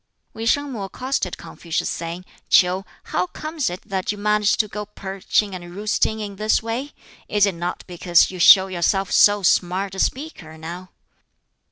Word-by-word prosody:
Wi 225 - -6
shang 285 +3 +1
Mau 210 -6 -4
accosted 250 -2 -3
Confucius, 165 -2 -4
saying, 170 +2 -5 0.2
"Kiu, 185 +2 +4 0.2
how 180 +1 -1
comes 310 - -3
it 180 +2 -7
that 195 -2 -2
you 210 - -6
manage 210 0 +2
to 215 - +1
go 210 0 -6
perching 195 0 -2
and 175 -1 -8
roosting 215 +1 0
in 200 -2 -6
this 215 +2 +1
way? 240 +6 -4 0.3
Is 210 -1 +3
it 200 - 0
not 175 +1 -4
because 175 -1 +2
you 185 - -8
show 190 +2 +8
yourself 190 +1 0
so 205 -1 +5
smart 185 +2 +1
a 190 - -6
speaker, 225 - -3
now?" 175 +3 -8
195 Hz, 170 wpm, -22 LUFS, 180-210 Hz, 0.3 s, show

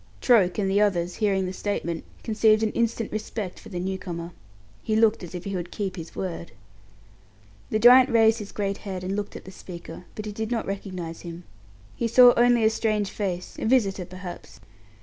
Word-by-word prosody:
Troke 200 -8 +4
and 200 -2 0
the 200 +2 +2
others, 180 -4 +1
hearing 195 -3 +1
the 185 - -4
statement, 170 -4 -3 0.2
conceived 215 -1 +3
an 215 - +1
instant 230 -1 -1
respect 215 -3 -5
for 220 - -13
the 180 -3 -4
new 190 +1 -3
comer. 170 -2 -6 0.5
He 215 - -1
looked 220 -2 +3
as 175 +1 -8
if 175 - -6
he 195 0 -4
would 175 -1 -4
keep 195 -2 -4
his 165 -3 -9
word. 175 -2 -5 1.2
The 215 - +1
giant 250 +3 +7
raised 225 -1 +4
his 205 -2 -8
great 200 -1 -2
head 190 -3 -6
and 190 +2 -2
looked 205 0 -4
at - - -9
the 190 - -9
speaker, 175 -2 -10
but 215 - -6
did 220 +1 -4
not 235 -2 -1
recognize 185 -4 -5
him. 170 0 -8 0.5
He 235 - -1
saw 245 +1 +8
only 240 -1 +4
a 220 - +4
strange 215 -3 0
face 185 -4 -4
a - - -3
visitor 200 -7 +2
perhaps. 180 -8 -9
200 Hz, 195 wpm, -25 LUFS, 180-220 Hz, 1.2 s, saw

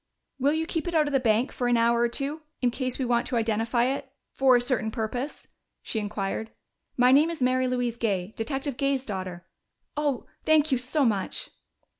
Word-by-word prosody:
"Will 280 +3 +3
you 320 +1 0
keep 325 0 -3
it 345 - -2
out 310 -1 +4
of 290 - -3
the 270 - +4
bank 235 +1 +2
for 245 - -2
an 240 -1 +3
hour 235 0 +3
or 240 - +3
two 280 +5 -3 0.2
in 245 -1 +2
case 255 0 -2
we 265 - -1
want 240 0 +1
to 250 - -2
identify 225 +1 +1
it 265 +1 -2 0.2
for 265 -2 +5
a - - +5
certain 245 -3 0
purpose?" 245 +5 -4 0.4
she 220 - -2
inquired. 205 +1 -3 0.5
"My 250 0 +5
name 295 +5 +6
is 335 - -5
Mary 255 0 +2
Louise 245 -2 -1
Gay 200 -3 -1
Detective 270 +3 -3
Gay's 275 -2 0
daughter.... 185 -4 -5 0.5
Oh, 290 -4 -1 0.2
thank 310 -1 +4
you 260 - +3
so 265 +3 +1
much!" 205 -5 -1
250 Hz, 200 wpm, -27 LUFS, 230-275 Hz, 0.5 s, name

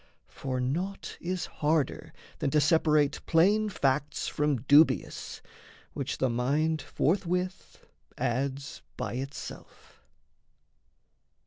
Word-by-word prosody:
For 130 -2 -4
naught 175 +10 -3
is 180 -1 -2
harder 150 -2 -1 0.3
than - - 0
to 150 - +3
separate 150 -1 +3
Plain 205 +6 +4
facts 140 -4 0
from 145 -5 0
dubious, 145 +3 +3 0.5
which - - -3
the 130 - +2
mind 145 +7 +1
forthwith 180 +2 -2 0.3
Adds 135 +3 -2 0.2
by - - -3
itself. 135 +3 -8
150 Hz, 95 wpm, -29 LUFS, 135-170 Hz, 0.5 s, Plain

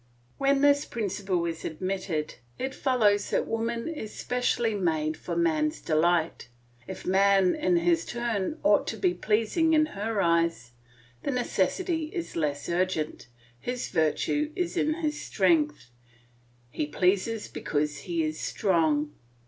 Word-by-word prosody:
When 275 0 +3
this 285 0 +5
principle 195 -5 -2
is 165 -1 -4
admitted, 175 -2 -3 0.2
it 265 0 -3
follows 220 -7 +2
that - - +1
woman 230 +2 -2
is 300 -10 -5
specially 245 -2 0
made 160 -5 0
for 170 - -5
man's 155 -3 +1
delight. 165 -3 +1 0.4
If - - -8
man 195 -1 +4
in 185 -1 +1
his 170 -1 +2
turn 235 +2 -2
ought - - +4
to - - -3
be 365 -2 +2
pleasing 230 +10 +1
in 310 -1 +5
her 210 +1 -2
eyes, 170 -8 +1 0.5
the - - -3
necessity 320 +6 0
is 335 +2 -6
less 145 -3 -1
urgent, 175 -5 -1 0.3
his 245 - -4
virtue 235 - 0
is 355 -2 -2
in 310 +1 +1
his 305 -3 -2
strength, 150 - +1 0.8
he 150 - -2
pleases 195 +7 +1
because 150 -1 -2
he 170 -2 +1
is 155 0 -3
strong. 155 -6 +1
190 Hz, 135 wpm, -27 LUFS, 165-245 Hz, 0.8 s, this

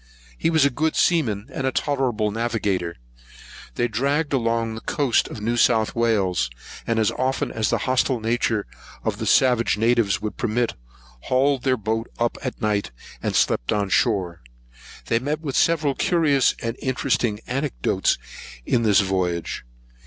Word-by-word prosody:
He 165 - 0
was 160 -3 +4
a 140 - +3
good 155 +5 0
seaman, 120 - +1
and 135 - -2
a - - +1
tolerable 125 -8 0
navigator. 105 -6 -1 0.8
They 120 - +1
dragged 140 +7 0
along 115 -3 0
the 110 - -7
coast 140 -7 +1
of 105 - -8
New 115 +3 -1
South 110 -2 +3
Wales; 100 - +1 0.4
and 115 - +1
as 110 -2 +2
often 130 +1 -1
as 110 -1 -1
the - - +2
hostile 130 -1 +1
nature 115 -1 0 0.4
of - - -2
the - - -3
savage 125 -4 +3
natives 115 -3 +2
would 105 - -5
permit, 120 +1 0 0.5
hauled 135 +1 +2
their 130 -1 +1
boat 110 +1 -2
up 120 0 -1
at 130 - -5
night, 105 - 0 0.3
and - - -2
slept - - +1
on 100 -2 0
shore. 95 -7 +1 0.6
They 115 - +1
met 150 +5 -2
with 140 -4 -4
several 155 -4 +2
curious 145 -4 +2
and 115 0 -2
interesting 125 -4 0
anecdotes 130 -7 0 0.5
in 120 - +2
this 105 -3 +4
voyage. 90 -7 -2
115 Hz, 155 wpm, -23 LUFS, 105-135 Hz, 0.8 s, was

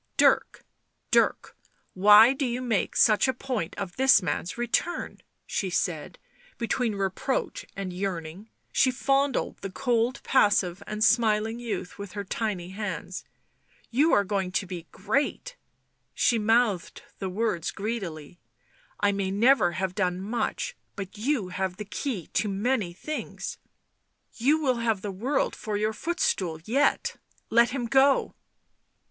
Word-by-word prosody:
" - - -45
Dirk, - - +3 0.5
Dirk, - - +2 0.4
why 210 +6 +7
do 275 - -3
you 245 -1 -1
make 240 -6 -1
such 215 +2 +5
a 260 - +1
point 245 -10 -3
of 190 -3 -5
this 265 -4 +6
man's 180 0 -3
return 240 +8 -1
?" - - -49
she - - -2
said, - - -2 0.4
between 230 -1 -1
reproach 195 +7 -2
and 195 -2 -4
yearning. 185 +1 -5 0.2
She 260 - +4
fondled 275 +1 0
the 195 - -5
cold, 240 +3 0
passive 200 -7 +2
and 215 0 -2
smiling 220 0 +3
youth 205 -7 -5
with 200 -2 -7
her 205 -1 -4
tiny 195 -3 -3
hands. 190 -2 -5 0.3
" - - -44 0.3
You 290 +7 +3
are 200 - +4
going 195 -2 -2
to 195 - 0
be 175 -2 -7
great 285 - -1 0.6
she 235 - +3
mouthed 220 -3 +1 0.2
the 190 - -3
words 190 -4 -1
greedily. 180 -7 -5 0.3
" - - -33
I 205 0 +3
may 195 -1 -1
never 205 -2 +4
have 185 0 -2
done 180 -2 0
much, 240 - -2 0.2
but 195 -1 -7
you 235 -5 0
have 185 0 -3
the 210 - -6
key 205 - -4
to 210 - +1
many 205 -1 0
things. 305 - -6 0.7
You 285 +7 +2
will 260 -5 +1
have 225 -4 0
the 205 - -3
world 245 +9 -1
for 210 -2 -3
your 215 +1 0
footstool 205 - -1
yet 275 +6 +1 0.2
— - - -37
let 235 +1 +5
him 250 -1 -3
go." 270 +3 +3
210 Hz, 150 wpm, -27 LUFS, 190-245 Hz, 0.7 s, why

